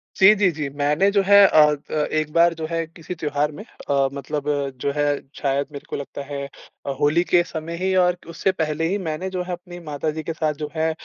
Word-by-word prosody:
जी, 190 +2 +7
जी, 200 -2 +3
जी। 150 -3 -4
मैंने 150 +7 +2
जो 200 -1 +3
है 200 +1 +6
अ 155 -4 +6 0.3
अ, - - -4 0.2
एक 155 -1 -1
बार 170 0 +5
जो 160 -1 -5
है 165 -1 -1
किसी 165 +2 -8
त्योहार 150 -2 -1
में 150 - -9
अ, 140 - -1
मतलब 140 +2 -4 0.4
जो 140 - 0
है, 145 0 +1 0.3
शायद 140 0 0
मेरे 140 -1 -9
को - - -3
लगता 140 0 -6
है 140 0 -5 0.4
अ, - - -3
होली 150 +4 +3
के 175 -1 +3
समय 165 0 -6
ही 190 +2 0
और 180 -1 +3
उससे 180 +3 0
पहले 160 -2 -1
ही 200 - 0
मैंने 180 0 -3
जो 185 -1 -3
है 180 - -6
अपनी 175 0 -9
माता 155 -2 -3
जी 155 +1 -6
के 165 - -3
साथ 155 -1 -1
जो 150 - -3
है 160 0 +1
160 Hz, 235 wpm, -22 LUFS, 150-175 Hz, 0.4 s, जी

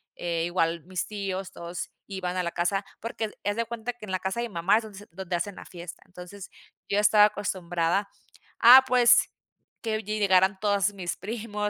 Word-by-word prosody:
eh, 170 -1 -2
igual 170 -2 0
mis 185 -1 -4
tíos, 195 -2 -4
todos 170 +1 -6 0.2
iban 185 -2 -4
a 180 - 0
la 170 - -2
casa, 195 +4 -1 0.2
porque, 230 0 -3
haz 215 - -8
haz 205 0 0
de 230 - 0
cuenta, 235 +1 -5
que 225 -3 -11
en 190 - -7
la 185 - -1
casa 190 +4 -3
de 240 - -2
mi - - -16
mamá 170 +5 +3
es 225 - -2
donde 210 -3 -11
s 205 - -14
donde 185 0 -4
hacen 185 +3 -3
la - - -11
fiesta. 175 -1 -10
Entonces, 180 +2 -11 0.4
yo 200 - +2
estaba 210 0 +6
acostumbrada, 185 -2 -1 0.5
ah, 255 +3 +10
pues, 245 -1 +5 0.5
que 220 -1 -2
llegaran 195 -2 +2
todas 205 -1 +1
mis 180 -3 -4
primos, 210 0 -4
195 Hz, 200 wpm, -26 LUFS, 180-210 Hz, 0.5 s, ah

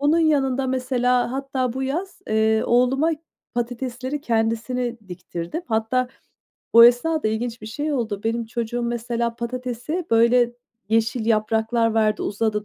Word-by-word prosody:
bunun 295 +3 +3
yanında 275 -5 +2
mesela 250 -1 +1
hatta 265 -2 -2
bu 265 +2 -3
yaz, 335 +9 -3
eee, 220 0 +2
oğluma 255 +6 +3 0.4
patatesleri 245 +3 -3
kendisine 235 0 -1
diktirdim. 180 - -6
Hatta 225 +3 0 0.7
o 230 0 +10
esnada 245 +3 +4
ilginç 225 +1 -3
bir - - -7
şey 290 +8 -3
oldu. 220 -7 -2
Benim 230 +1 0
çocuğum 235 +1 -3
mesela 235 0 -2
patatesi, 250 +7 -4
böyle, 235 +1 +4 0.4
yeşil 225 +1 +1
yapraklar 225 +1 +1
verdi, 215 -1 +2
uzadı, 210 0 -1
240 Hz, 130 wpm, -23 LUFS, 225-255 Hz, 0.7 s, o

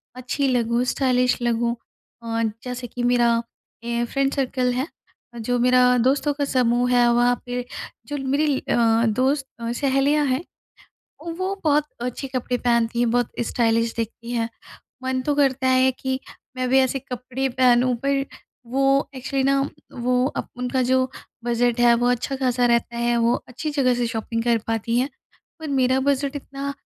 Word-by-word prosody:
अच्छी 255 +2 -1
लगूँ, 240 -1 +1
स्टाइलिश 250 -1 +1
लगूँ। 235 0 0 0.5
अ, 230 0 -1 0.2
जैसे 250 -1 -5
कि 245 +1 -5
मेरा 240 -1 +3 0.5
ए 235 0 -1
फ्रेंड 275 +2 0
सर्कल 255 -2 0
है 260 +5 -1 0.5
जो 245 +2 -1
मेरा 250 0 +4
दोस्तों 270 +4 +2
का 285 0 -1
समूह 245 -2 +2
है 245 -1 +5
वहाँ 245 +1 +3
पे 245 0 -3 0.4
जो 290 0 -3
मेरी 280 +1 +1
अ, - - -1 0.3
दोस्त 265 +5 +1 0.4
सहेलियाँ 280 +2 +2
हैं 265 +4 0 0.9
वो 375 +1 -1
बहुत 295 -1 +3 0.2
अच्छे 250 +3 -4
कपड़े 255 -1 -2
पहनती 235 -1 +1
हैं 240 -1 +2
बहुत 245 -1 +1 0.2
स्टाइलिश 230 -1 +1
दिखती 230 +1 -5
हैं। 230 -1 -1 0.5
मन 260 0 -1
तो 290 - +1
करता 270 -2 +2
है 260 0 +4
कि 260 0 -2 0.4
मैं 255 0 0
भी 265 +1 +5
ऐसे 265 +1 +1
कपड़े 255 +1 -4
पहनूँ 250 0 +3
पर 275 -1 +1 0.5
वो 270 +1 +1 0.3
एक्चुअली 265 +1 -2
न 275 0 +1 0.3
वो 250 +1 +2
अब - - -3
उनका 250 +1 -1
जो 260 0 +3 0.4
बजट 240 0 +1
है 240 -1 +6
वो 245 - +3
अच्छा-खासा 250 0 0
रहता 235 0 +1
है 240 0 +1
वो 235 +1 +3
अच्छी 260 +5 -5
जगह 265 -4 +2
से 240 -1 0
शॉपिंग 230 0 -3
कर 235 -1 +3
पाती 225 +1 0
हैं। 265 +3 0 0.5
पर 315 - -5
मेरा 260 -1 +2
बजट 280 0 +1
इतना 275 0 -5
250 Hz, 160 wpm, -23 LUFS, 240-270 Hz, 0.9 s, है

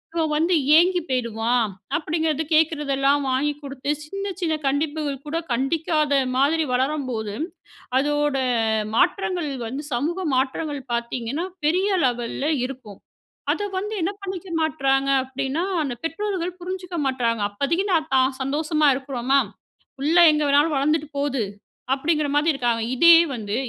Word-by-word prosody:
இவன் 315 -2 0
வந்து 335 +4 +2 0.2
ஏங்கி 355 +2 +4
போயிருவான்." 235 -2 0 0.3
அப்படிங்கிறது. 315 -1 -1
கேக்கிறதெல்லாம் 290 -3 +2
வாங்கி 275 +3 +1
குடுத்து 275 0 -3
சின்ன 395 +5 -4
சின்ன 320 -3 +1
கண்டிப்புகள் 290 -1 -1
கூட 325 +3 -1
கண்டிக்காத 305 +3 0 0.2
மாதிரி 315 +4 +2
வளரும்போது, 255 -6 -1 0.6
அதோட 295 0 +1 0.6
மாற்றங்கள் 355 - +1 0.2
வந்து 275 +6 -5
சமூக 340 +9 -1
மாற்றங்கள் 280 +2 -1
பாத்தீங்கன்னா 235 +6 -2 0.2
பெரிய 365 +6 +2 0.2
லெவல்ல 245 +3 -1 0.2
இருக்கும். 250 -7 -9 0.5
அத 410 - -2
வந்து 420 +3 -4
என்ன 380 +5 0
பண்ணிக்க 380 -1 -6
மாட்றாங்க 275 -3 +1 0.2
அப்டின்னா, 270 +5 -2 0.2
அந்த 255 -3 -3
பெற்றோர்கள் 365 0 -3
புரிஞ்சுக்க 365 -1 -5
மாட்றாங்க. 235 -4 0
அப்பதைக்கு 325 - -1
நான் 315 -3 +1
தான் 260 0 +2
சந்தோஷமா 305 +3 +1
இருக்குறோமா, 270 0 +1 0.6
"புள்ள 310 +5 +2
எங்கே 300 -1 +1
வேணாலும் 290 +2 +3
வளந்துட்டு 300 +2 +1
போது!" 275 -4 0 0.5
அப்படிங்கிற 300 +1 0
மாதி 300 +3 +3
இருக்காங்க. 240 -4 0
இதே 335 +6 +8 0.2
வந்து 210 -3 -4
290 Hz, 125 wpm, -23 LUFS, 265-325 Hz, 0.6 s, இதே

